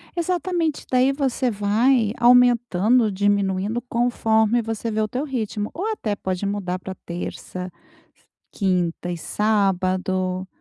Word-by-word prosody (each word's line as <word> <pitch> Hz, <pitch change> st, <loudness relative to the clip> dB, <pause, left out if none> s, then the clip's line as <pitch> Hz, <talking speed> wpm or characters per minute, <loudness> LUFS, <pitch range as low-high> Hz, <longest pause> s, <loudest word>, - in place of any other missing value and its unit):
Exatamente, 345 Hz, -2 st, -1 dB
daí 255 Hz, +1 st, +4 dB
você 265 Hz, -3 st, 0 dB
vai 215 Hz, +2 st, +2 dB
aumentando 240 Hz, -2 st, +4 dB
ou 215 Hz, -, 0 dB
diminuindo, 200 Hz, +2 st, 0 dB
conforme 235 Hz, -2 st, +1 dB
você 225 Hz, 0 st, -4 dB
vê 220 Hz, 0 st, 0 dB
o 215 Hz, -, 0 dB
teu 250 Hz, +6 st, -3 dB
ritmo. 220 Hz, -6 st, -3 dB
Ou 410 Hz, +6 st, -2 dB
até 215 Hz, -, -2 dB
pode 185 Hz, 0 st, -3 dB
mudar 195 Hz, -2 st, -2 dB
pra 190 Hz, +1 st, -7 dB
terça, 180 Hz, +1 st, -6 dB, 0.4 s
s -, -, -33 dB, 0.3 s
quinta 180 Hz, -3 st, -1 dB
e 175 Hz, -, -4 dB
sábado. 185 Hz, -2 st, 0 dB
215 Hz, 130 wpm, -22 LUFS, 190-245 Hz, 0.4 s, daí